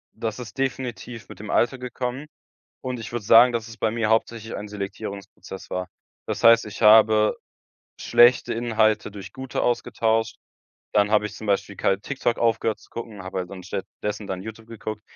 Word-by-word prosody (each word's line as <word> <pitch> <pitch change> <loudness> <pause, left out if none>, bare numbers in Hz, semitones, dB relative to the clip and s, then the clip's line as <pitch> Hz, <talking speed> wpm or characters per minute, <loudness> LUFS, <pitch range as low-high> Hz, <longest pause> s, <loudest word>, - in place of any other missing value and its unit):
Das 110 +1 -4
ist 125 +1 -9
definitiv 125 -3 -4
mit - - -11
dem 105 0 -8
Alter 130 +2 +2
gekommen. 125 +2 -4 0.6
Und 130 -2 -4
ich 115 - -7
würde 120 -3 -4
sagen, 115 +3 +8
dass 115 -1 -3
es 115 -1 -11
bei 110 0 0
mir 115 -1 -1
hauptsächlich 115 0 0
ein 105 - -6
Selektierungsprozess 100 -1 -7
war. 90 0 -3 0.4
Das - - -3
heißt, 115 0 +7
ich 105 - -9
habe 110 0 +6 0.7
schlechte 120 +1 +5
Inhalte 110 -2 +1
durch 100 -2 -10
gute 130 -1 -4
ausgetauscht. 115 -2 0 0.6
Dann 105 -1 +3
habe 105 -1 +3
ich 105 - -5
zum 110 - -8
Beispiel 100 0 0
kalt 95 +2 0
TikTok 135 -4 -1
aufgehört 115 -1 +1
zu - - -20
gucken, 110 -4 -8
habe 95 0 -4
halt 90 -1 -5
dann 100 - -8
an - - -11
stattdessen 100 +2 -5
dann 95 -1 -4
YouTube 110 +2 -9
geguckt. 110 -2 -6
110 Hz, 180 wpm, -24 LUFS, 105-120 Hz, 0.7 s, sagen